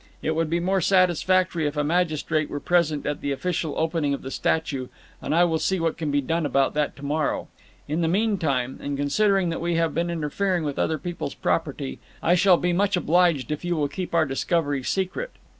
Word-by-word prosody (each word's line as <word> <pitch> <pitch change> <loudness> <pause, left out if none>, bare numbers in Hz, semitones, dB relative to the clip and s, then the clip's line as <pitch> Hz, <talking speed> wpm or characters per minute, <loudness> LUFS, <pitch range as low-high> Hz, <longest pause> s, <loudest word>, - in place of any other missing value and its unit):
"It 160 - 0
would 165 -1 0
be 170 +2 +1
more 190 +2 +1
satisfactory 185 -2 +2
if 145 +1 -4
a 150 - +2
magistrate 155 -2 0
were 145 - -4
present 160 -3 +1
at 145 -1 -2
the 140 - -2
official 160 +1 -2
opening 160 -3 0
of - - -10
the 135 - -6
statue, 140 -6 -1 0.3
and - - -1
I 175 - +5
will 165 -2 +1
see 190 +2 0
what 165 -1 0
can 160 -3 -3
be 145 0 +1
done 165 +5 -1
about 140 -2 +1
that 150 -1 -1
to 140 - -9
morrow. 150 +2 -1 0.4
In 155 +4 -1
the 165 - +2
meantime, 165 - 0
and 140 -1 -3
considering 190 +6 +2
that 165 - -3
we 170 0 0
have 165 -2 +1
been 170 +1 -1
interfering 170 +3 -1
with 145 -2 -3
other 160 - +1
people's 175 +4 -5
property, 65 0 -2 0.2
I 170 - +4
shall 180 0 +5
be 175 +1 0
much 195 +1 +2
obliged 170 -4 +2
if 150 - -3
you 175 0 0
will 150 -2 +1
keep 175 +4 -5
our 165 -1 +4
discovery 145 0 0
secret." 190 - -2
165 Hz, 210 wpm, -24 LUFS, 145-175 Hz, 0.4 s, I